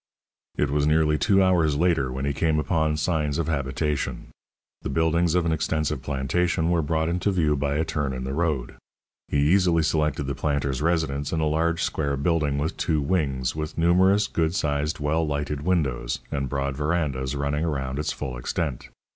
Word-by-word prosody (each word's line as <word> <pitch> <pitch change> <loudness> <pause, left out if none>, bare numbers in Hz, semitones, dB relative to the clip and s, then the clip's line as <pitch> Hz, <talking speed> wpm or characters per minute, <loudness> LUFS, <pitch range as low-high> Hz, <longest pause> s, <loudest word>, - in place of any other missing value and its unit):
It 75 -2 +1
was 75 0 +1
nearly 75 0 +3
two 95 -2 +4
hours 85 -5 +3
later 80 -5 +1
when 65 +2 -3
he 70 - 0
came 80 +2 +1
upon 80 -1 +1
signs 75 -3 0
of 85 -2 -1
habitation. 70 0 -2 0.5
The - - -4
buildings 80 +3 +2
of 90 -2 +2
an 85 - +1
extensive 80 -3 -1
plantation 80 +5 0
were 85 -1 +2
brought 80 +1 0
into 90 +4 0
view 80 -6 +2
by 70 0 -1
a 80 +2 +1
turn 75 -3 -2
in 65 -1 -4
the 65 +1 -3
road. 75 -6 -1 0.5
He - - -1 0.2
easily 90 -4 +3
selected 75 -2 0
the 70 0 -3
planter's 70 -1 -1
residence 75 -4 0
in 80 - 0
a 80 - +1
large 80 +2 +1
square 70 -2 -1
building 75 -1 +1
with 75 +3 -2
two 80 -2 +1
wings, 70 -5 0
with 75 0 -5
numerous 95 +5 +4
good 80 -2 -1
sized, 75 -1 -1
well 75 +3 +1
lighted 75 -1 -2
windows, 70 -8 0
and 70 -2 -2
broad 70 +1 -2
verandas 75 -3 -1
running 70 +2 -1
around 70 -4 -2
its 75 - -1
full 65 -2 -5
extent. 70 +1 -3
75 Hz, 180 wpm, -25 LUFS, 70-80 Hz, 0.5 s, two